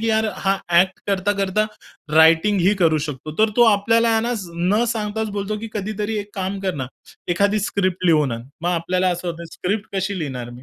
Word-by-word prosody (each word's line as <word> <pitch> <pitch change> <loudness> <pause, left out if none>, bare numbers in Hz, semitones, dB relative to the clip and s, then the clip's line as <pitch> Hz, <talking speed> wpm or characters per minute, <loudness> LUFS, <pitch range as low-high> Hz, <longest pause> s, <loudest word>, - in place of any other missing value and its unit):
की 225 - -2
यार 220 0 +2
हा 195 0 +1 0.2
ॲक्ट 190 +1 +2
करता-करता 200 +1 +1 0.5
रायटिंगही 170 +5 +5
करू 160 -2 +4
शकतो. 150 +2 -6
तर 220 0 +4
तो 240 - +7
आपल्याला 230 +3 +2
आहे 225 0 +3
ना, 240 +1 -1 0.4
न 235 - +3
सांगताच 215 0 -3
बोलतो, 200 +2 -2
की 225 - -6
कधीतरी 210 +1 -3
एक 205 0 -6
काम 195 0 -3
कर 190 -2 -2
ना, 130 -3 -4 0.4
एखादी 200 +4 +2
स्क्रिप्ट 190 -4 -1
लिहून 150 -6 +3
आण. 115 0 -5 0.2
मग 175 - +1
आपल्याला 180 +2 0
असं 175 0 -2
होतंय, 170 0 -6
स्क्रिप्ट 200 +4 -3
कशी 190 +1 -1
लिहिणार 130 -7 -5
मी. 120 +1 -12
195 Hz, 190 wpm, -21 LUFS, 170-210 Hz, 0.5 s, तो